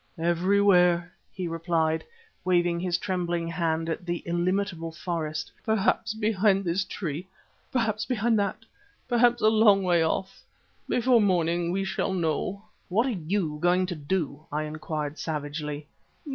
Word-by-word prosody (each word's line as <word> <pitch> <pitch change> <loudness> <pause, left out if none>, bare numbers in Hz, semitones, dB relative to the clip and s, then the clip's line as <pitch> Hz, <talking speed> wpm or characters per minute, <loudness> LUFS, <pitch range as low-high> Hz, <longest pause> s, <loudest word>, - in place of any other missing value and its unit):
"Everywhere," 180 0 +3 0.2
he 185 -2 -4
replied, 165 -1 0 0.4
waving 175 -1 +2
his 175 -1 0
trembling 175 -2 -2
hand 165 -1 -1
at 165 +2 -3
the 175 -1 -3
illimitable 175 0 -1
forest. 160 -2 -4
"Perhaps 220 0 +1
behind 210 -2 +2
this 175 +3 +1
tree, 170 -3 -5 0.4
perhaps 225 -3 0
behind 230 -2 +2
that, 205 +2 -2 0.4
perhaps 240 -1 +3
a - - +6
long 215 -3 +5
way 175 -2 +3
off. 190 +4 -2 0.5
Before 245 -1 +4
morning 175 -3 +1
we 195 +2 0
shall 190 0 -1
know." 180 +4 -1 0.3
"What 215 +7 +2
are 265 - 0 0.2
you 170 -7 0
going 180 +1 +3
to 180 -1 -4
do?" 150 -1 -2
I 150 +1 -1
inquired 155 -1 -4
savagely. 150 -1 -4
175 Hz, 135 wpm, -27 LUFS, 165-200 Hz, 0.5 s, a